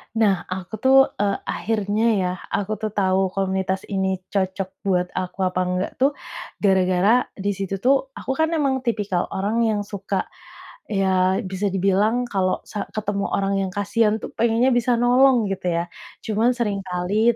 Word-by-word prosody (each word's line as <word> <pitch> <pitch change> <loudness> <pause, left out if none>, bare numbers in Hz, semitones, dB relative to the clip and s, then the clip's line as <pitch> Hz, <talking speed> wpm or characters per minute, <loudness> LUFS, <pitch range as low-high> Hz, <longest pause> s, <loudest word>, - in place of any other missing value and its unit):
Nah 200 -5 +2
aku 185 +2 -6
tuh, 265 +3 +5 0.2
e - - +2 0.2
akhirnya 210 -1 -1 0.2
ya, 180 - 0 0.3
aku 205 +1 -2
tuh 215 - 0
tahu 190 -1 +2
komunitas 190 -1 -1
ini 190 -1 0 0.2
cocok 190 -1 -1 0.2
buat 180 -2 +2
aku 185 +1 -3
apa 185 0 0
enggak 180 0 -1
tuh, 275 +2 +3 0.5
gara-gara, 190 +4 +3
di 200 +1 -1
situ 195 0 -3
tuh, 265 +3 +5 0.2
aku - - -4
kan 320 - +4
emang 275 -4 +1
tipikal 210 -7 -1
orang 205 +4 0
yang 210 -2 0
suka, 200 -1 -3 0.6
ya, 190 -2 +2
bisa 190 +2 -1
dibilang 200 +5 +2
kalau 185 -2 0
sa 205 -2 -5
ketemu 205 -2 -1
orang 195 0 0
yang 190 - -1
kasihan 210 +1 +2
tuh - - -7
pengennya 235 +3 +3
bisa 245 0 +2
nolong 245 -2 +4
gitu 185 -1 -3
ya. 170 0 +1 0.4
Cuman 220 +3 +2
seringkali 200 +1 0
200 Hz, 155 wpm, -22 LUFS, 190-225 Hz, 0.6 s, tuh